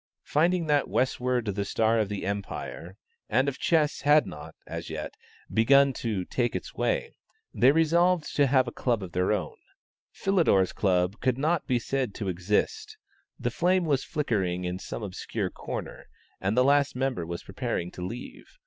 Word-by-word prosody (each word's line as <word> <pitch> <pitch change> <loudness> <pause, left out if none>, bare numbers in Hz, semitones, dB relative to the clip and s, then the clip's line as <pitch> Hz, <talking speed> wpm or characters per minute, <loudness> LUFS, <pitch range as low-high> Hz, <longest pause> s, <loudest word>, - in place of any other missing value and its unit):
Finding 170 +3 +2
that 145 -2 +2
"westward 125 -1 0
the 100 -1 -1
star 110 +3 +1
of 105 -2 -1
empire" 100 -2 -5 0.3
and 130 +5 +2
of 140 - -2
chess 155 -3 +2
had 145 +1 +5
not, - - -9
as - - -6
yet, - - -5 0.4
begun 140 +4 +5
to 105 -7 -3
"take 120 +4 -1
its - - -5
way," - - -1 0.4
they 130 - +5
resolved 170 +2 +2
to 145 -1 +4
have 130 -1 +3
a - - -3
Club 120 -5 -1
of 90 - -7
their 90 +1 +1
own. - - -2 0.6
Philidor's 165 - +2
Club 90 0 +1
could 125 0 +1
not 155 +4 0
be 125 - +2
said 125 -2 -2
to 100 -4 -3
exist; 420 - -1 0.4
the - - -1
flame 180 +1 +2
was 140 -4 +1
flickering 95 - -1
in 90 +1 -3
some 110 - -6
obscure 95 -3 -4
corner, - - -7 0.3
and 100 +5 -1
the 125 - +6
last 140 0 +3
member 130 -7 -1
was 85 +1 -6
preparing 85 +1 -3
to - - -9
leave. 120 - -8
125 Hz, 165 wpm, -27 LUFS, 100-150 Hz, 0.6 s, the